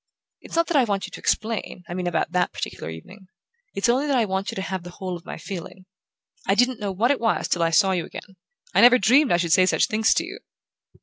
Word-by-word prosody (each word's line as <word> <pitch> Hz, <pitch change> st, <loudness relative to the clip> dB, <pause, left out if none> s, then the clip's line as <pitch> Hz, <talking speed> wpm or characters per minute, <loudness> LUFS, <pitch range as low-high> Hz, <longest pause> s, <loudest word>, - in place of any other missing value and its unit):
It's -, -, -9 dB
not 335 Hz, 0 st, +3 dB
that 335 Hz, -, 0 dB
I 270 Hz, -, +5 dB
want 200 Hz, -3 st, -2 dB
you -, -, -11 dB
to -, -, -9 dB
explain 220 Hz, -4 st, -2 dB
I -, -, -6 dB
mean 180 Hz, 0 st, -3 dB
about 170 Hz, -1 st, -1 dB
that 180 Hz, 0 st, +1 dB
particular -, -, -5 dB
evening. 185 Hz, -, -11 dB, 0.5 s
It's 200 Hz, -, +1 dB
only 260 Hz, +5 st, +2 dB
that 275 Hz, -2 st, +2 dB
I 235 Hz, -, +2 dB
want 190 Hz, 0 st, -2 dB
you -, -, -5 dB
to 190 Hz, -, -3 dB
have 190 Hz, -1 st, -4 dB
the 175 Hz, -, -10 dB
whole 185 Hz, 0 st, -6 dB
of 170 Hz, +1 st, -11 dB
my -, -, -6 dB
feeling. 185 Hz, 0 st, -8 dB, 0.6 s
I 195 Hz, -, +3 dB
didn't 245 Hz, +1 st, +2 dB
know 205 Hz, -2 st, -3 dB
what 225 Hz, +7 st, +1 dB
it 285 Hz, -, -1 dB
was 225 Hz, -, 0 dB
till 175 Hz, -, 0 dB
I 165 Hz, -, +3 dB
saw 180 Hz, +4 st, +3 dB
you 180 Hz, -3 st, 0 dB
again. 195 Hz, -, -11 dB, 0.4 s
I -, -, +4 dB
never 245 Hz, +1 st, +8 dB
dreamed 255 Hz, +6 st, +4 dB
I 175 Hz, -, +4 dB
should 170 Hz, -2 st, +1 dB
say 185 Hz, 0 st, +5 dB
such -, -, +3 dB
things 220 Hz, -1 st, +2 dB
to -, -, 0 dB
you!" -, -, -9 dB
195 Hz, 260 wpm, -23 LUFS, 180-235 Hz, 0.6 s, never